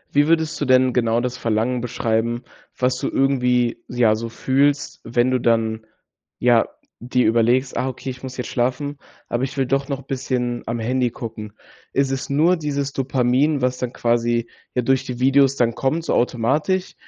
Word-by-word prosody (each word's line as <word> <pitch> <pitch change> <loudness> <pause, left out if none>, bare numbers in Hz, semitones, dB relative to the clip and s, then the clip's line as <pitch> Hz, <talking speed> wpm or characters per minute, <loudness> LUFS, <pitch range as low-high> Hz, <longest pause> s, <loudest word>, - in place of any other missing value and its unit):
Wie 145 +1 +4
würdest 160 -2 +1
du - - +1
denn 130 -1 +4
genau 115 -1 +2
das 125 0 -3
Verlangen 115 +2 0
beschreiben, 120 0 -1 0.3
was 125 0 +1
du - - -2
irgendwie 125 -3 +1
ja 120 -3 +3
so 115 +1 -5
fühlst, 140 +4 0
wenn 120 +2 +1
du 130 - +2
dann 110 -2 0 0.5
ja 120 -2 +3 0.3
dir 125 +1 0
überlegst: 120 +4 +2
„Ah, 130 - 0
okay, 130 +1 -6
ich 125 - -11
muss 130 -1 -7
jetzt 125 - -4
schlafen, 140 +3 -1 0.3
aber 120 - -2
ich 135 +1 -4
will 135 - +2
doch 135 +2 0
noch 140 -1 -3
'n 135 - -20
bisschen 125 -2 -2
am 115 - -2
Handy 125 +2 0
gucken.“ 110 -3 -7 0.4
Ist 135 -1 +1
es 135 0 -3
nur 165 +6 +3
dieses 140 -2 -2
Dopamin, 135 +2 +1
was 125 0 0
dann 125 -1 -2
quasi, 120 -1 0 0.3
ja, 125 - +1
durch 135 +1 +2
die 125 -2 -6
Videos 135 +1 +4
dann 115 -3 +1
kommt 155 +7 -1
so - - 0
automatisch? 140 +10 0
125 Hz, 185 wpm, -21 LUFS, 120-135 Hz, 0.5 s, Wie